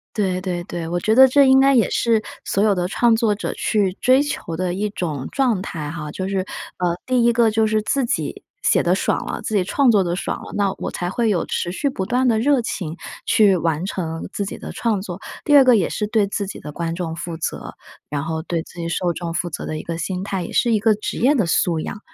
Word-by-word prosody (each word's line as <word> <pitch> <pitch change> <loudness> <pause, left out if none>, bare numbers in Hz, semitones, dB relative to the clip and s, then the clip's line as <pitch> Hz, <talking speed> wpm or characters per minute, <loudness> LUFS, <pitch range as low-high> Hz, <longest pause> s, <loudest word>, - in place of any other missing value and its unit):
对 190 -4 0
对 180 -2 -3
对， 170 -1 -5
我 175 +1 -1
觉 215 +5 +1
得 265 +2 +8
这 280 +2 +5
应 265 0 +6
该 275 0 +5
也 235 - +4
是 230 -2 +2 0.2
所 200 - +1
有 210 -2 +4
的 180 -1 -1
创 230 +4 +3
作 225 -2 +2
者 205 - -4
去 205 -4 +1
追 260 +2 +5
求 205 - -4
的 180 0 -1
一 205 +3 -1
种 155 -9 -4
状 250 -8 +1
态 155 -6 -5
哈。 150 -1 -6
就 185 +5 -4
是， 195 0 -1 0.4
呃， 175 -1 0
第 255 -2 +2
一 235 - +5
个 230 -1 +3
就 220 0 +2
是 215 0 +1
自 270 +5 0
己 235 - -2 0.2
写 - - +3
得 - - +2
爽 - - 0
了， - - -4
自 220 - -4
己 200 - +3
创 255 +8 +2
作 205 -4 +4
得 175 -1 -1
爽 - - -4
了， - - -10
那 200 -2 +1
我 - - -4
才 175 - -3
会 230 +3 0
有 200 -5 0
持 175 - -2
续 280 +9 -1
不 190 - -3
断 250 +5 +1
的 230 -3 +3
热 275 +3 +3
情 175 -7 -4 0.3
去 215 -4 +4
完 165 -1 -1
成 165 -4 -4
自 200 - -2
己 195 - -6
的 - - -7
创 220 -4 0
作； 180 -3 -6 0.3
第 290 - +5
二 280 - +9
个 250 -2 +6
也 185 -6 +1
是 210 - -2
对 215 -2 +2
自 200 0 -3
己 195 - -7
的 150 - -8
观 165 +1 -3
众 170 -2 -4
负 165 0 -5
责， 160 - -5 0.3
然 145 -1 -3
后 160 0 -3
对 170 0 -2
自 175 - -12
己 165 - -3
受 175 +1 0
众 170 0 -5
负 175 +1 -1
责 - - -5
的 155 - -3
一 - - -6
个 165 -1 -5
心 185 +2 -3
态， 195 -2 -3
也 - - -6
是 240 - +2
一 215 - +2
个 220 0 +4
职 210 - -4
业 270 +5 +4
的 225 -10 +1
素 170 0 +2
养。 205 - -6
195 Hz, 280 characters per minute, -21 LUFS, 170-230 Hz, 0.4 s, 二